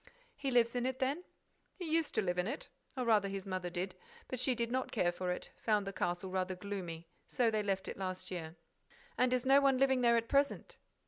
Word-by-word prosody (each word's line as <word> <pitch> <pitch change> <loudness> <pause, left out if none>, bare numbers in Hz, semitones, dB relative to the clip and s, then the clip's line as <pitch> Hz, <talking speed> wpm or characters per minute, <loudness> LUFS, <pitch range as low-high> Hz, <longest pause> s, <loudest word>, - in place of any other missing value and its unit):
"He 275 -1 -2
lives 240 -1 +3
in 245 +1 +1
it, 260 0 -2
then?" 275 +7 0 0.5
"He 365 - -6
used 325 -1 +1
to - - +2
live 180 -1 0
in 180 - +1
it, 275 +6 -4 0.3
or 250 - 0
rather 210 -3 +4
his 195 -1 -4
mother 185 -2 -3
did. 180 +2 -3 0.4
But 255 - -3
she 255 0 +2
did 235 0 -1
not 260 +1 -1
care 175 -6 +2
for 180 +1 -3
it; 180 - -3
found 210 -2 +2
the 195 - -4
castle 175 +1 -2
rather 185 0 -1
gloomy. 180 -4 -5 0.2
So 235 -3 +2
they 215 -1 +1
left 195 -2 -1
it - - -5
last 185 -1 -4
year." 165 -2 -5 0.6
"And 250 0 +3
is 255 0 +1
no 275 +1 +6
one 270 -2 +4
living 265 -1 +3
there 235 -1 +5
at 230 0 0
present?" 280 +2 +1
215 Hz, 230 wpm, -34 LUFS, 185-255 Hz, 0.6 s, no